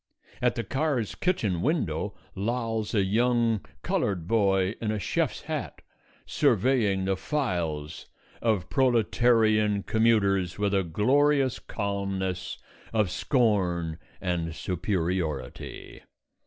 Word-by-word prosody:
At 125 -1 +2
the 115 - -2
car's 135 -6 -1
kitchen 105 - 0
window - - -1 0.2
lolls 115 +1 -2
a 100 - +4
young 115 +1 +2 0.2
coloured 90 -5 -1
boy 95 -3 +2
in 110 - -1
a 110 - 0
chef's 100 - -1
hat, - - -5 0.4
surveying 110 -7 +2
the 95 0 +1
files 85 - -3 0.3
of 110 -8 +1
proletarian 110 -4 +3
commuters 100 -5 +2
with 100 -1 0
a 100 - +3
glorious 130 - +2
calmness 100 -3 -3 0.3
of 105 -5 +1
scorn 90 - +1 0.2
and 85 -3 -2
superiority. 85 - -3
105 Hz, 100 wpm, -27 LUFS, 95-115 Hz, 0.4 s, a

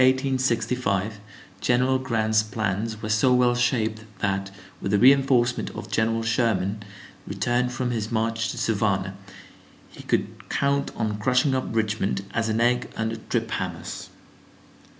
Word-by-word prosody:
In 130 - +7
February, 135 -1 -1
1865, 110 -4 0 0.4
General 125 +2 +2
Grant's 110 -4 +1
plans 110 0 -3
were 110 - -3
so 110 +4 +3
well 125 -1 +4
shaped 110 -3 0
that, 95 -1 -1 0.3
with - - -2
the 105 - +4
reenforcement 130 0 +4
of - - -7
General 115 0 +1
Sherman 110 -3 0 0.5
returned 125 +1 0
from 125 -1 -2
his 110 -2 -3
march 115 0 0
to - - -5
Savannah, 100 -3 0 0.8
he - - -11
could - - -2
count 140 0 +1
on 105 -1 -2
crushing 125 +4 +2
up 130 0 -1
Richmond, 105 -3 -1
as 115 0 0
an 110 +1 0
egg 125 +1 +2
under 110 +1 -2
trip 115 0 -2
hammers. 90 -3 -4
115 Hz, 145 wpm, -25 LUFS, 110-125 Hz, 0.8 s, In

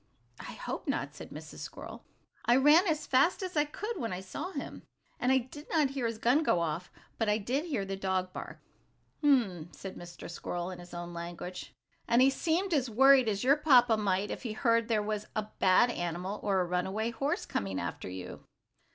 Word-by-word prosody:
"I - - -8
hope - - -6
not," - - -1
said - - -10
Mrs. - - -10
Squirrel. - - -8 0.4
"I 240 - +4
ran 300 +8 +6
as 310 -2 0
fast 280 +9 +3
as 370 -2 -5
I 295 -1 +3
could 420 +9 -5
when 230 -5 -2
I 180 - -3
saw 235 - -6
him, 285 -7 -6 0.4
and 250 - +2
I 265 - +6
did 260 +4 -7
not 300 -5 +2
hear 265 -4 -1
his 230 -1 -4
gun 245 +7 +3
go 180 - +2
off, 170 +1 -3 0.3
but 225 -2 +1
I 210 - +3
did 255 +9 -1
hear 270 - -2
the 195 0 -3
dog 190 -1 -1
bark." - - -7 0.6
"Hum!" 215 - +2
said 195 -1 -8
Mr. 175 0 -9
Squirrel, 175 +1 -4
in 180 - -8
his 175 0 -11
own 175 0 -6
language, 175 +1 -7 0.3
and 235 +1 +4
he 265 +1 +6
seemed 340 +6 0
as 265 -5 +1
worried 260 +1 +6
as 205 +1 -1
your 275 +4 +5
papa 250 -6 +5
might 205 -1 0
be - - -2
if - - -8
he 230 -4 -4
heard 230 0 +2
there 220 -3 +1
was 210 0 -3
a 215 0 -2
bad 190 +6 +5
animal, 175 +2 -3
or 195 -2 +1
a - - 0
runaway 190 +6 -1
horse, 275 +6 -1
coming 95 -1 -2
after 85 +1 -5
you. 90 0 -8
220 Hz, 210 wpm, -31 LUFS, 185-275 Hz, 0.6 s, ran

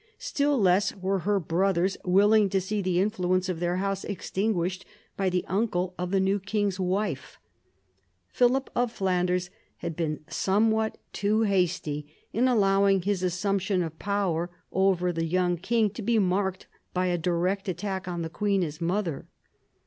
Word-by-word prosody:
Still 285 -2 0
less 190 0 +3
were 190 0 -1
her 200 +3 +1
brothers 185 +2 +1
willing 205 +3 +4
to 195 0 +1
see 205 +3 -2
the 180 -2 +1
influence 185 -2 +1
of 175 -3 -2
their 175 0 0
house 195 0 -1
extinguished 190 -2 -2 0.3
by 195 -1 +1
the 180 0 -1
uncle 185 -3 0
of 180 0 -2
the 195 +1 +2
new 195 +1 +2
king's 200 -1 -1
wife. 185 -4 -2 0.9
Philip 255 +2 +2
of 245 -1 +1
Flanders 180 -2 0 0.3
had 170 -2 -5
been 155 -2 -2
somewhat 220 +3 +1 0.2
too 210 +2 +1
hasty 170 -7 0 0.2
in 245 +4 +3
allowing 195 -4 +3
his 200 -1 0
assumption 190 +1 0
of 160 -1 -7
power 185 -4 -1 0.2
over 185 -2 +2
the 165 0 -1
young 175 +1 +1
king 215 +4 +1
to 230 - -7
be 230 +2 +1
marked 190 -1 0 0.3
by 180 0 +1
a 180 -1 +1
direct 180 +4 0
attack 190 +1 -3
on 175 -2 -3
the 160 - -4
queen 200 -1 +1
his 155 -1 -5
mother. 175 -3 -1
190 Hz, 155 wpm, -27 LUFS, 180-205 Hz, 0.9 s, willing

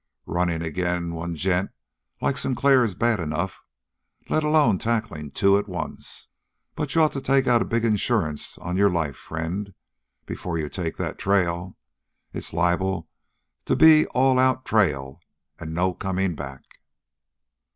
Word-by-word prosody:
"Running 85 -1 -1
agin' 85 +1 -2
one 85 +1 -4
gent 90 +3 0 0.5
like 140 - +1
Sinclair 135 +1 +3
is 105 -6 -2
bad 115 +1 +1
enough 80 +3 -3 0.7
let 155 - +1
alone 150 - +3
tackling 110 -10 -2
two 100 +8 +3
at 105 - -5
once. 90 -4 -6 0.5
But 145 -3 -4
you'd 165 - +5
ought 155 - +3
to 135 - -4
take 135 0 +2
out 120 -2 +4
a - - 0
big 115 0 0
insurance 105 -8 0
on 90 +1 -4
your 100 +1 +5
life, 80 -6 -1
friend, 85 +5 -5 0.5
before 85 -2 -4
you 75 -2 -3
take 85 -2 -4
that - - -4
trail. 90 -2 0 0.6
It's - - -4
liable 90 +3 0 0.6
to - - +1
be 155 -1 +7
all 130 0 +3
out 130 0 +2
trail 75 -9 +1 0.4
and 80 -1 -6
no 90 +1 +1
coming 95 -1 -1
back." 70 -3 -8
95 Hz, 150 wpm, -24 LUFS, 85-115 Hz, 0.7 s, be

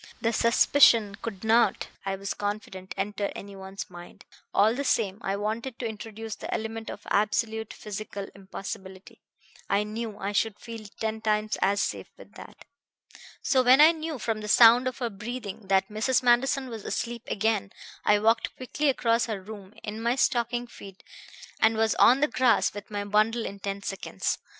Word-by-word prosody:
The 230 0 0
suspicion 230 -2 +5
could 200 -4 -6
not, 225 +2 +3 0.2
I 195 - 0
was 195 +1 -4
confident, 205 -2 -5
enter 200 +1 -2
any 200 0 -8
one's 195 +1 -7
mind. 175 -1 -13 0.3
All 215 +3 +4
the 280 +3 -2
same, 210 -6 0
I 195 - -1
wanted 225 +5 -3
to 245 - -5
introduce 220 0 -7
the - - -7
element 225 0 -4
of 205 - -9
absolute 220 +1 0
physical 205 -2 -6
impossibility; 190 -1 -9 0.5
I 200 +1 +2
knew 215 0 -5
I 200 0 -3
should 210 +1 0
feel 225 -3 -8
ten 220 0 -2
times 215 0 0
as 200 +1 +2
safe - - -4
with - - -15
that. - - -13 0.8
"So 260 - +3
when 255 +2 +6
I 310 +2 +9
knew 320 -2 -5
from 225 -3 -2
the 210 - -6
sound 235 +3 +7
of 255 - -3
her 240 -3 -2
breathing 210 -1 -7
that 190 0 +3
Mrs. 225 +5 +1
Manderson 260 +2 +3
was 225 -3 -7
asleep 235 -1 -3
again 210 -2 0 0.3
I 210 - +4
walked 225 +2 +1
quickly 285 +3 -1
across 235 -3 +1
her 215 -3 -3
room 200 0 -10
in 215 +1 -5
my 235 +2 +1
stocking 240 -2 +1
feet 195 -5 -13 0.6
and 220 0 +3
was 220 0 +2
on 260 +3 +6
the 295 - +4
grass 245 -1 +2
with 205 0 -9
my 205 -1 -3
bundle 215 +3 +2
in 200 - -6
ten 200 0 -4
seconds. 195 -1 -3
220 Hz, 175 wpm, -27 LUFS, 200-235 Hz, 0.8 s, I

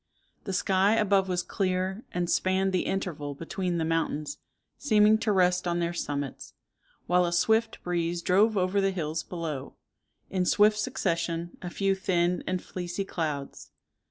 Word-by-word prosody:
The 195 - -3
sky 195 +3 +3
above 200 -3 +2
was 180 -1 0
clear, 190 +2 -1
and 175 0 -1
spanned 190 +2 +1
the 185 - 0
interval 150 -7 -3
between 175 +3 -3
the 160 - 0
mountains, 160 -2 -1 0.4
seeming 215 -5 +4
to 220 - 0
rest 180 -2 +2
on 175 0 0
their 170 0 -1
summits, 145 -5 -4 0.5
while 180 0 +3
a 175 - 0
swift 220 +6 +1
breeze 170 -1 -1
drove 205 +4 +3
over 185 +2 +2
the 195 - +2
hills 160 -4 -2
below, 160 -7 -5 0.6
in 185 -1 +1
swift 210 0 +4
succession, 170 -7 -2
a 180 - -5
few 195 +2 +1
thin 180 -2 0
and 185 -1 -1
fleecy 180 +2 -4
clouds. 150 -6 -4
180 Hz, 155 wpm, -28 LUFS, 170-195 Hz, 0.6 s, seeming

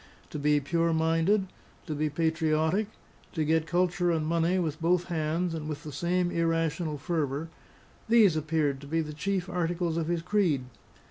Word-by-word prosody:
To 150 - -4
be 150 0 +3
pure 165 +3 0
minded, 165 +5 +2 0.4
to 155 - -3
be 150 +1 0
patriotic, 160 +5 +1 0.5
to 160 -3 0
get 160 +1 +1
culture 175 +1 +1
and 160 -2 +1
money 170 +3 +1
with 160 -3 -2
both 175 +1 +2
hands 165 +1 -1
and 155 -1 -4
with 150 0 -5
the 155 - -7
same 175 +4 0
irrational 165 -1 0
fervour 150 0 -2 0.6
these 220 -7 +6
appeared 155 -3 0
to 140 - -10
be 165 +2 0
the 150 -1 -5
chief 190 +3 -2
articles 175 -1 -1
of 165 -1 -1
his 170 -1 -1
creed. 175 -9 +1
165 Hz, 165 wpm, -28 LUFS, 155-175 Hz, 0.6 s, these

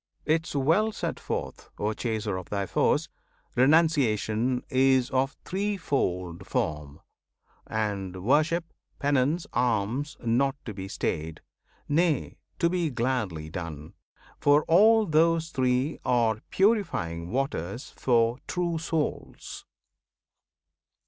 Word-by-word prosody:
'Tis 160 0 0
well 165 +11 +3
set - - -4
forth, - - -5
O 105 +1 -1
Chaser 110 -3 -2
of 95 -2 -6
thy 100 -1 -1
Foes! - - +1 0.5
Renunciation 130 -5 +2
is 130 0 +3
of 135 +1 0
threefold 140 - -2
form, 75 -1 -2 0.7
And 100 -4 -3
Worship, 155 - +2 0.3
Penance, 145 +4 +1
Alms, 120 +4 0
not 125 +4 +1
to 110 - -5
be 95 -1 -6
stayed; 80 -4 -3 0.5
Nay, 160 +1 +1 0.2
to 170 - +2
be 170 -2 0
gladly 115 - -2
done; 80 -4 -7 0.5
for 145 +1 +4
all 215 +6 +5
those 165 0 +2
three 130 +3 0
Are 115 -3 +1
purifying 95 - +1
waters 125 - -3
for 120 0 +2
true 175 -2 -1
souls! 160 -2 -4
130 Hz, 105 wpm, -27 LUFS, 105-160 Hz, 0.7 s, all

